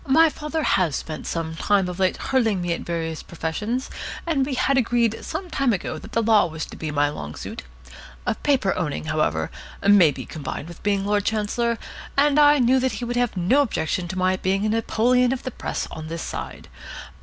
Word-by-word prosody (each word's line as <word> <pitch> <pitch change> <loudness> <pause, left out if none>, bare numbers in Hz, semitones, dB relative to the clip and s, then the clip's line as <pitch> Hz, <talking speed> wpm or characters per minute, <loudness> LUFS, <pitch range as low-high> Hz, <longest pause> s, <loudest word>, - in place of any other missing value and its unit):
My 320 +4 +6
father 305 +1 -3
has 175 - +2
spent 155 -1 -5
some 160 -1 -3
time 195 +2 +2
of 180 +1 -6
late 185 -1 +2
hurling 230 -7 +1
me 175 -1 0
at - - -4
various 165 -2 -3
professions, 210 +10 -3 0.4
and 315 -5 +1
we 275 - -2
had 275 +2 +2
agreed 235 -3 +1
some 375 - -4
time 270 -4 +2
ago 185 - -3
that - - -12
the 230 - +2
Law 215 -4 +5
was 160 -1 -5
to - - -11
be 155 - -4
my 145 -1 +2
long 75 - -6
suit. - - -6 0.8
Paper 260 -9 +2
owning, 165 -6 -2
however, 155 - 0 0.4
may 200 -5 +7
be 145 - -5
combined 145 0 -6
with 170 -1 -11
being 200 -1 0
Lord 205 0 +1
Chancellor, 225 +2 0 0.4
and 290 +1 +4
I 295 0 +7
knew 255 0 +4
he 250 -2 -1
would 240 +1 -3
have 245 -5 0
no 195 +12 +4
objection 180 - -1
to 185 +2 -5
my 185 0 +2
being 195 +2 0
a - - +1
Napoleon 240 +3 +2
of 265 - -5
the 255 - -4
Press - - -4
on 155 0 -7
this 165 0 -4
side. - - -6
205 Hz, 200 wpm, -23 LUFS, 170-250 Hz, 0.8 s, may